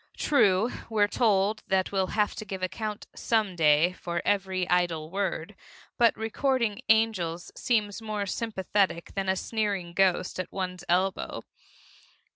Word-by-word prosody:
True, 215 -5 +3 0.2
we're 210 -2 +3
told 210 -1 +2
that 190 -1 +1
we'll 190 -1 +1
have 210 -1 +2
to - - -4
give 190 -3 -6
account 210 +3 -4
Some 215 -5 0
Day 160 +2 +4
for 175 -1 -4
every 190 -2 0
idle 170 -3 0
word, 195 -1 -2 0.5
but 235 -1 +4
recording 230 0 0
angels 195 -7 +1
seem 215 -4 +1
more 215 -2 -3
sympathetic 195 -4 -1
than 195 -1 -2
a 190 - +3
sneering 200 -5 -2
ghost 185 -1 +1
at 185 - -4
one's 180 -2 -4
elbow. 185 +2 0
195 Hz, 135 wpm, -27 LUFS, 180-215 Hz, 0.5 s, Day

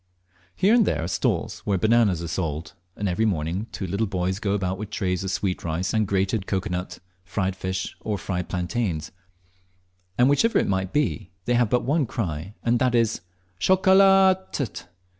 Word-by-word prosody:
Here 200 - +3
and 235 -1 +6
there 80 - 0
are - - -2
stalls - - -1
where 100 -2 -1
bananas 110 -4 +3
are - - -4
sold, 80 -1 -3 0.2
and 100 - -2
every 95 +4 0
morning 90 +2 -1
two 95 - -4
little 100 +5 -1
boys 95 0 -1
go 100 -3 -1
about 95 -1 -1
with 105 -1 -5
trays 95 -3 -1
of 95 - -3
sweet 95 0 -2
rice 85 +3 -2
and 110 -2 +1
crated 95 +1 0
cocoa 95 0 -2
nut, 90 0 -4 0.3
fried 95 +1 -2
fish, 95 0 -4
or 105 -2 -2
fried 90 0 -4
plantains; 90 -3 -2 1.1
and 125 - +5
whichever 185 +12 +3
it - - +2
may 95 -1 0
be, 105 -3 -1 0.2
they 120 - +1
have 120 -2 +3
but 125 - +2
one 140 +1 +1
cry, 90 -3 -4
and 120 0 +2
that 125 -1 +2
is 115 -5 +1 0.4
"Chocolat 190 - +5
t 140 - 0
t!" - - -9
100 Hz, 185 wpm, -24 LUFS, 90-120 Hz, 1.1 s, and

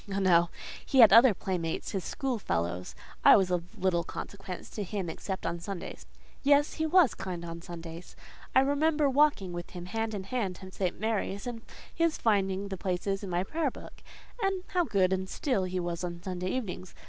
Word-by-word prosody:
Oh, 195 - -1
no! 175 -3 +4 0.3
he 265 - +4
had 220 -4 +9
other 230 -1 +8
playmates—his 180 +1 -3
school 265 -5 -2
fellows; 85 - -2 0.3
I - - +9
was 185 -2 +1
of 175 -1 -3
little 180 -2 +1
consequence 195 +2 -7
to 215 - -5
him, 190 -3 -3
except 190 +3 -5
on 170 - -2
Sundays: 180 +1 -7 0.3
yes, 285 +1 +4
he 315 0 -1
was 345 -5 +5
kind 180 -3 -5
on 170 0 -7
Sundays. 170 -1 -9 0.4
I 260 - +8
remember 295 +2 +2
walking 270 -10 +3
with 175 0 -6
him 175 -1 -8
hand 225 +3 -2
in 195 - -4
hand 195 -3 -2
to 190 0 -11
St. 185 -2 -2
Mary's, 205 -2 -1
and 240 -2 -5 0.3
his 335 -1 +1
finding 195 -2 +1
the 190 - -4
places 195 +2 -2
in 195 - -5
my 175 0 0
prayer 310 +7 -1
book; - - -12 0.4
and 390 -2 0
how 355 -2 +1
good 190 -6 +2
and 190 0 -2
still 250 -11 0
he 185 0 -2
was 175 0 -3
on 170 -1 -5
Sunday 185 -1 -3
evenings! 190 -6 -4
190 Hz, 190 wpm, -29 LUFS, 180-240 Hz, 0.4 s, had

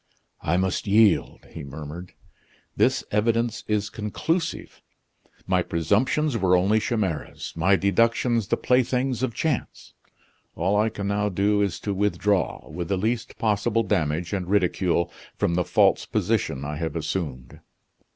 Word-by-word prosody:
"I 85 +3 +1
must 95 +2 -1
yield," 105 -1 +3
he 80 - -8
murmured; 75 +5 -8 0.6
"this - - +2
evidence 115 +2 +1
is 105 0 -1
conclusive. 160 - -3 0.6
My - - +2
presumptions 115 - +1
were 90 -2 +4
only 100 +5 +3
chimeras; 105 -9 -3
my 90 +4 +3
deductions 115 +3 +2
the - - +1
playthings 125 0 +1
of 130 -3 -1
chance! 155 -7 -3 0.6
All 95 +5 +1
I 105 +2 +3
can 100 -2 -5
now 105 +1 0
do 100 +2 +1
is 100 -5 -1
to 100 - -2
withdraw, 100 -1 0
with 85 -1 -5
the 100 - 0
least 115 +4 -2
possible 110 +1 +1
damage 85 -3 -1
and 95 -3 -2
ridicule, 90 -3 +1 0.3
from 85 - +1
the 90 +1 +1
false - - +3
position 70 0 -1
I 75 +1 -4
have 80 +1 -3
assumed." 75 -6 -4
100 Hz, 140 wpm, -25 LUFS, 85-110 Hz, 0.6 s, were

